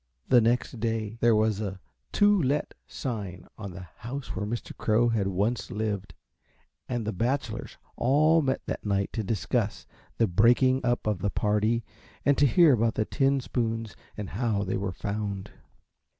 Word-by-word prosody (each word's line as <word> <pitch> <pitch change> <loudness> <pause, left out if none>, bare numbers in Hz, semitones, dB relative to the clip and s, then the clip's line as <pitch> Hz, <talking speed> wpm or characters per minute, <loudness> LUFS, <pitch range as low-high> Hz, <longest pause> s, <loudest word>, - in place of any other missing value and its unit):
The 125 -2 +7
next 120 +1 0
day 110 0 -2
there 115 -1 +4
was 110 -1 +2
a 95 -2 -4 0.3
to 205 -2 +4
let 145 +1 0
sign 100 -8 -5
on 100 -2 -7
the 90 0 -9
house 125 +4 -6
where 105 - -2
Mr. 115 +2 -5
Crow 115 +2 +2
had 110 -4 +1
once 100 +6 -1
lived, 105 -6 -3 0.7
and 120 -3 -2
the 110 - -2
bachelors 125 +8 -2 0.2
all 155 +6 +4
met 135 -2 -1
that - - -4
night 100 -1 0
to 110 - -2
discuss 105 +2 -1 0.3
the 115 - +4
breaking 120 +7 +4
up 120 -1 0
of 105 -4 0
the 100 - 0
party 105 +4 +1 0.4
and 140 - +5
to 145 - +6
hear 165 +2 +6
about 115 -1 +1
the 110 - +1
tin 135 +1 +1
spoons 115 -3 -2 0.2
and 105 -3 -5
how 105 -2 0
they 95 - -2
were 100 -1 -2
found. 100 0 -4
110 Hz, 165 wpm, -27 LUFS, 100-125 Hz, 0.7 s, The